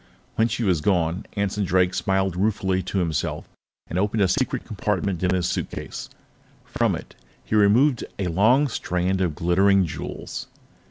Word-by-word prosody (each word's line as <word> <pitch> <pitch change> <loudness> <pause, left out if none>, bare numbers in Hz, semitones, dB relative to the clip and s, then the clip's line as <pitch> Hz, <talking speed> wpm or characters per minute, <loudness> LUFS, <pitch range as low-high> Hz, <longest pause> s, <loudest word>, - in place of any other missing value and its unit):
When 110 - +2
she 115 +1 -2
was 90 -7 +2
gone, 85 -1 0
Anson 100 0 -1
Drake 90 0 +2
smiled 95 0 0
ruefully 95 -1 0
to 95 +2 -4
himself 85 -6 -1 0.4
and 90 - -3
opened 105 +1 +1
a - - +4
secret - - -1
compartment 95 -4 -2
in 90 0 +2
his 90 -2 +1
suitcase. - - -4 0.6
From - - 0
it, - - -9 0.3
he - - -5
removed 110 +6 +4
a 100 - -2
long 110 - +3
strand 95 -5 -1
of 85 -5 0
glittering 95 +4 +3
jewels. 80 - -6
95 Hz, 155 wpm, -24 LUFS, 90-105 Hz, 0.6 s, a